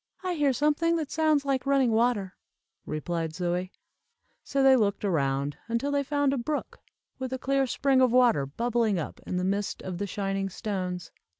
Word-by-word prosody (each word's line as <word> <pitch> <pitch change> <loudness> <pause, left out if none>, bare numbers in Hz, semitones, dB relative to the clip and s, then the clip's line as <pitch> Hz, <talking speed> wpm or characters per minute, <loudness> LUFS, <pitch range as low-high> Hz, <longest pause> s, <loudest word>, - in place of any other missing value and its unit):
"I 365 -1 -1
hear 295 -4 +2
something 300 +5 +2
that 315 -3 -3
sounds 310 -3 +2
like 275 -1 -1
running 270 -4 +3
water," 220 -4 +1 0.5
replied 160 +1 -3
Zoie. 180 +1 -1 0.7
So 275 -1 0
they 265 0 +7
looked 205 -4 +1
around, 140 -5 0
until 235 +5 -1
they 285 0 +2
found 285 0 +1
a 275 - -1
brook, 290 +5 -3 0.4
with 260 -1 -4
a 260 - -2
clear 270 +1 +1
spring 270 +1 +2
of 255 -2 +4
water 240 - +4
bubbling 230 - 0
up 160 - -5
in 180 - -2
the 180 - -1
midst 200 +2 -2
of 180 -2 -5
the 205 - -2
shining 195 0 -2
stones. 185 -4 -4
235 Hz, 180 wpm, -27 LUFS, 185-275 Hz, 0.7 s, they